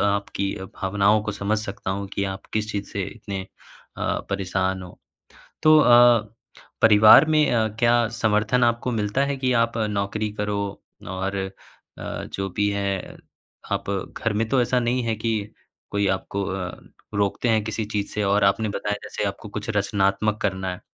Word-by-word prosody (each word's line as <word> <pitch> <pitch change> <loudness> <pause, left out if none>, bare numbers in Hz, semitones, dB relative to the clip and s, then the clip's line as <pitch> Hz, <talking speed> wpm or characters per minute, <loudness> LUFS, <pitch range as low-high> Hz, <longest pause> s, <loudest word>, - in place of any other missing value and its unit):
आपकी 100 -1 0
अ, 95 - -7
भावनाओं 100 +3 +1
को 105 -1 -3
समझ 100 +2 -1
सकता 100 -3 -5
हूँ 100 +1 -3
कि 100 - 0
आप - - -12
किस 110 0 -1
चीज़ 100 -1 -4
से 100 - -2
इतने 100 -1 -6 0.6
अ, - - -1
परेशान 95 -1 -1
हो 90 - -12 0.6
तो 155 0 +7
अ, 120 -4 +5 0.5
परिवार 110 +6 +8
में 155 -1 +4
अ, 110 -2 +2
क्या 120 -1 +4
समर्थन 110 +3 +2
आपको 120 +1 +1
मिलता 110 +5 0
है 140 0 -2
कि 130 -1 0
आप 115 0 -2
नौकरी 105 0 -1
करो? 105 0 -1 0.5
और 95 +1 -3
अ, 95 0 -3 0.5
जो 95 0 -5
भी 105 0 +2
है, 100 -2 -3 0.6
आप - - -2
घर 100 +2 -3
में 110 +2 -1
तो 130 +1 +2
ऐसा 125 +1 +1
नहीं 120 +1 0
है 115 -1 0
कि 115 +1 -2 0.6
कोई 100 -1 0
आपको 95 +1 -2
अ, 95 -2 -4 0.4
रोकते 100 +4 0
हैं 110 -1 +3
किसी 110 0 -3
चीज़ 105 -1 -3
से? 105 - -1
और 100 +1 +3
आपने 100 +2 +2
बताया 105 0 -2
जैसे - - -4
आपको 100 +2 -8
कुछ 105 +2 -5
रचनात्मक 100 +1 +1
करना 95 -1 -1
है, - - -12
105 Hz, 170 wpm, -24 LUFS, 100-115 Hz, 0.6 s, परिवार